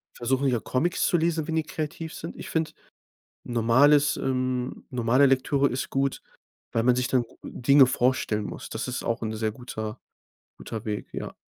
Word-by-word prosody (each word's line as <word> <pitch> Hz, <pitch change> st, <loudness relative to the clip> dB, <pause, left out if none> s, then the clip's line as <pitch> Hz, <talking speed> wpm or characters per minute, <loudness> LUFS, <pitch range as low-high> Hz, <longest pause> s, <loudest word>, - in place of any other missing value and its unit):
versuchen 130 Hz, +3 st, 0 dB
ja 125 Hz, -3 st, +2 dB
Comics 150 Hz, +10 st, 0 dB
zu 175 Hz, -, +3 dB
lesen, 165 Hz, -1 st, 0 dB
wenn 160 Hz, -, -2 dB
die 160 Hz, -, +1 dB
kreativ 155 Hz, +1 st, -5 dB
sind. 165 Hz, -, -7 dB
Ich -, -, -8 dB
finde, 160 Hz, -1 st, -1 dB, 0.7 s
normales, 130 Hz, +5 st, +4 dB
ähm 130 Hz, -1 st, -2 dB
normale 125 Hz, +2 st, +3 dB
Lektüre 135 Hz, +1 st, +2 dB
ist 130 Hz, +1 st, -3 dB
gut, 135 Hz, 0 st, 0 dB, 0.5 s
weil 115 Hz, -, +1 dB
man 125 Hz, +1 st, +4 dB
sich 125 Hz, 0 st, 0 dB
dann 125 Hz, -1 st, +2 dB, 0.2 s
Dinge 140 Hz, +2 st, +5 dB
vorstellen 120 Hz, -4 st, +1 dB
muss. -, -, -7 dB
Das -, -, -4 dB
ist -, -, -3 dB
auch 115 Hz, -, -1 dB
'n 110 Hz, -1 st, -2 dB
sehr 110 Hz, 0 st, -1 dB
guter 110 Hz, -1 st, -6 dB, 0.6 s
guter 110 Hz, -2 st, -6 dB
Weg, 105 Hz, -1 st, -3 dB
ja. -, -, -5 dB
130 Hz, 175 wpm, -26 LUFS, 120-145 Hz, 0.7 s, Dinge